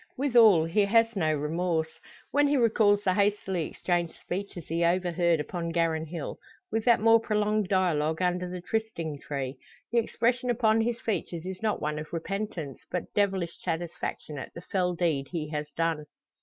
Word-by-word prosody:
Withal 230 - +6
he 200 +5 +2
has 230 +2 +3
no 160 -5 +1
remorse. 160 +2 -1 0.3
When 290 +1 +4
he 285 0 +2
recalls 215 -4 +3
the 185 - +2
hastily 200 -4 0
exchanged 175 -2 -1
speeches 185 -3 -6
he 165 +1 0
overheard 170 -1 +2
upon 170 +3 -3
Garran 165 -1 0
hill, 170 +2 -6 0.3
with 225 -1 -1
that 235 -2 +5
more 225 +1 +6
prolonged 210 -2 0
dialogue 160 -5 +1
under 180 0 0
the 180 0 -6
trysting 175 -7 -3
tree, 135 -2 -4 0.3
the 235 - +4
expression 240 +2 0
upon 225 -2 +3
his 235 +1 -1
features 180 -6 -3
is 190 +1 -6
not 220 -1 -1
one 150 0 -1
of 155 - -8
repentance, 170 -4 -4
but 180 - -4
devilish 190 -4 0
satisfaction 160 -3 -4
at - - -7
the 170 - -7
fell 180 -1 -1
deed 160 -6 0
he 160 -4 -4
has 150 -1 -4
done. 160 0 -1
180 Hz, 170 wpm, -28 LUFS, 160-215 Hz, 0.3 s, Withal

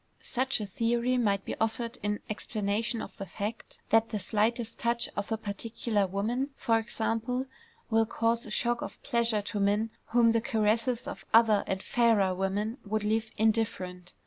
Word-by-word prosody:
Such 260 0 0
a 210 - -3
theory 235 +5 +1
might 200 -4 +1
be - - -3
offered 230 +2 -1
in 205 0 -1
explanation 215 +2 -2
of - - -9
the 195 - -6
fact 210 +5 -5
that 225 0 +4
the 215 - -2
slightest 220 +3 0
touch 235 0 +1
of 205 +2 -3
a 225 - +1
particular 215 0 -1
woman, 225 +8 -1
for 225 -3 +2
example, 230 +3 -1 0.5
will 225 0 +4
cause 230 +1 0
a - - -8
shock 235 +2 0
of - - -6
pleasure 235 -5 +1
to 205 - -3
men 205 +3 +2
whom 235 -1 +4
the 230 0 +2
caresses 225 +2 +1
of - - -6
other 225 -3 +6
and 190 0 -2
fairer 225 -6 +3
women 200 +6 -1
would 215 +1 -1
leave 220 +1 0
indifferent. 205 -5 0
225 Hz, 170 wpm, -29 LUFS, 205-235 Hz, 0.5 s, other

